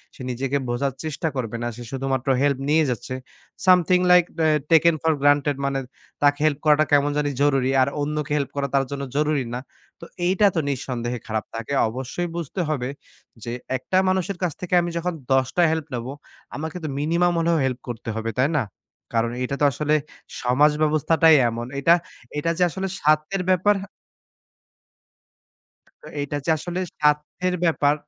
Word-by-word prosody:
সে - - -12
নিজেকে 135 +3 -1
বোঝার 135 +3 -1
চেষ্টা 155 +1 -3
করবে 120 -3 -3
না। - - -1
সে 120 - -8
শুধুমাত্র 135 0 -2
হেল্প 140 -2 +2
নিয়ে 155 +1 +4
যাচ্ছে। 125 +1 -4 0.5
Something 180 -1 +5
like 180 -1 +7 0.2
a - - +5 0.2
taken 165 0 +6
for 160 0 +2
granted. 145 0 +3
মানে 140 0 0 0.4
তাকে 145 0 +3
হেল্প 150 -2 +1
করাটা 155 0 +5
কেমন 145 0 +4
জানি 150 -1 +1
জরুরি 135 -2 +2
আর 130 - +3
অন্যকে 150 0 -2
হেল্প 140 -2 -1
করা 140 0 -1
তার 135 -1 +3
জন্য 140 0 -4
জরুরি 150 -2 +1
না। 125 - -2 0.4
তো - - -9 0.2
এইটা 190 +3 +3
তো - - +2
নিঃসন্দেহে 125 -2 -3
খারাপ। 110 -1 -2
তাকে 115 +5 -4 0.2
অবশ্যই 130 +9 -4
বুঝতে 170 +2 -3
হবে 130 -5 -1 0.5
যে, 120 - -4 0.3
একটা 160 +9 -1
মানুষের 185 0 -1
কাছ 175 - +1
থেকে 180 0 -5
আমি 175 - -2
যখন 175 +1 -2 0.2
১০ 130 -1 +3
টা 175 - +5
হেল্প 160 -3 -2
নেব। 120 -1 -3 0.5
আমাকে 160 +4 -5
তো - - -2
মিনিমাম 170 +4 +2
হলেও 165 0 +2
হেল্প 130 -1 -2
করতে 120 -1 -6
হবে, 110 0 -3
তাই 130 +3 +3
না? 135 - +2 0.5
কারণ, 115 0 +1
এটা 135 +2 -2
তো - - +5
আসলে 150 +4 0 0.5
সমাজ 135 +5 +4
ব্যবস্থাটাই 155 +1 +4
এমন। 120 +1 -5
এটা, 165 +5 +5 0.4
এটা, 150 +3 0
যে 180 - +3
আসলে 190 +3 -3
স্বার্থের 155 +6 +1
ব্যাপার 185 +3 +4 2.3
তো, - - -15
এইটা 145 +1 -3
যে - - 0
আসলে 175 +3 -4 0.2
স্বার্থের 150 +5 +1
ব্যাপার 150 -3 +3
145 Hz, 170 wpm, -23 LUFS, 130-165 Hz, 2.3 s, like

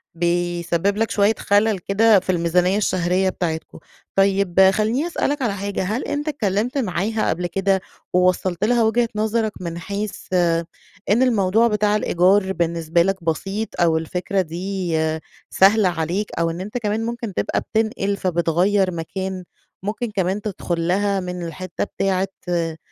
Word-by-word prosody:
بيسبب 175 +2 0
لك 225 0 0
شويّة 205 +1 +3
خلل 205 -1 +2
كده 205 +3 +4
في 185 0 -1
الميزانيّة 180 +2 +2
الشهرية 185 -1 +1
بتاعتكم. 160 -3 -4 0.4
طيّب 195 -1 +4
خلّيني 220 - 0
أسألك 290 -4 -1
على 230 -5 0
حاجة، 200 0 -3
هل 215 +7 -2
أنتَ 290 +1 -3
اتكلمت 235 -2 -1
معاها 215 -1 0
قبل 175 +2 -1
كده، 195 +1 +1 0.3
ووصلت 180 0 +1
لها 235 +2 +3
وجهة 230 +2 +2
نظرك 220 +1 0
من 170 -1 -4
حيث 200 +3 -4
آآ، 170 -2 +2 0.4
إن 230 +6 +4
الموضوع 225 -1 +3
بتاع 210 -1 +1
الإيجار 190 0 +2
بالنسبة 170 -1 +1
لك 190 0 0
بسيط، 195 +7 -2
أو 165 -2 +4
الفكرة 180 +4 -1
دي 180 0 -3 0.5
سهلة 200 0 +4
عليك؟ 175 +5 -2
أو 165 0 +2
إن 170 +2 -5
أنتَ 210 +5 -5
كمان 220 -1 -1
ممكن 235 -3 -4
تبقى - - -1
بتنقل، 215 -3 -1
فبتغير 180 +2 +1
مكان؟ 185 +3 -4 0.4
ممكن 215 +3 -3
كمان 190 +1 -1
تدخل 175 -5 -3
لها 200 +2 +1
من 180 -1 -5
الحتة 170 +2 -4
بتاعة 195 -1 -1 0.2
آآ، 165 -2 -1
190 Hz, 145 wpm, -21 LUFS, 175-210 Hz, 0.5 s, كده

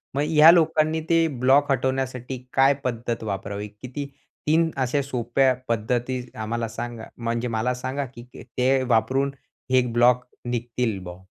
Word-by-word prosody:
मग 140 - +1
ह्या 155 +1 +8
लोकांनी 160 -1 +2
ते 165 0 +4
ब्लॉक 140 +3 +4
हटवण्यासाठी 130 -1 -1 0.2
काय 135 +1 +5
पद्धत 120 -2 -3
वापरावी? 100 0 -4
किती 125 +7 -7 0.4
3 160 +1 +3
अशा 140 +3 0
सोप्या 130 0 +1
पद्धती 120 +3 -1
आम्हाला 115 +1 -3
सांगा 115 0 -6
म्हणजे 115 +1 -2
मला 115 +2 0
सांगा 135 +2 -2
की 120 - -9
ते 130 +1 -1
वापरून 130 +3 +1 0.4
हे 130 0 +5
ब्लॉक 125 +1 +4 0.3
निघतील 120 -3 -2
बा? 90 0 -9
125 Hz, 140 wpm, -24 LUFS, 115-135 Hz, 0.4 s, ह्या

